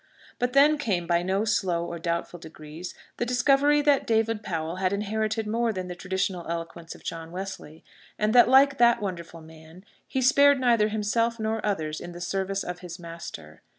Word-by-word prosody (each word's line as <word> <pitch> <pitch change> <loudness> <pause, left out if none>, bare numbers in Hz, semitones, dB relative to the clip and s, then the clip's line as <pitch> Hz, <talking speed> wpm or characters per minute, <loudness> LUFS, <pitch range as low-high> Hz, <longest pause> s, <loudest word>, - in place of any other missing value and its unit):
But 245 0 -1
then 290 +2 +5
came, 195 -11 -1
by 170 0 +1
no 190 +4 0
slow 180 -6 0
or 170 0 -6
doubtful 170 +1 -3
degrees, 160 +2 -10 0.2
the - - -1
discovery 280 +4 +3
that 285 -2 +2
David 225 -1 +1
Powell 165 -3 -4
had 185 0 0
inherited 215 +2 -1
more 230 +2 0
than 185 -3 -5
the 180 - -5
traditional 185 -1 -2
eloquence 165 0 -6
of - - -16
John 165 -1 -6
Wesley; 185 -4 -7 0.3
and 215 +1 +1
that, 245 0 +7
like 275 +1 +5
that 235 0 +5
wonderful 170 -4 -6
man, 160 +3 -15 0.2
he 265 - -2
spared 280 +1 +5
neither 235 -4 +3
himself 225 +2 0
nor 220 0 -2
others 155 -7 -2
in 175 - -8
the 175 - -9
service 195 +2 -2
of 180 0 -6
his 175 -1 -8
Master. 165 - -10
195 Hz, 185 wpm, -26 LUFS, 170-230 Hz, 0.3 s, that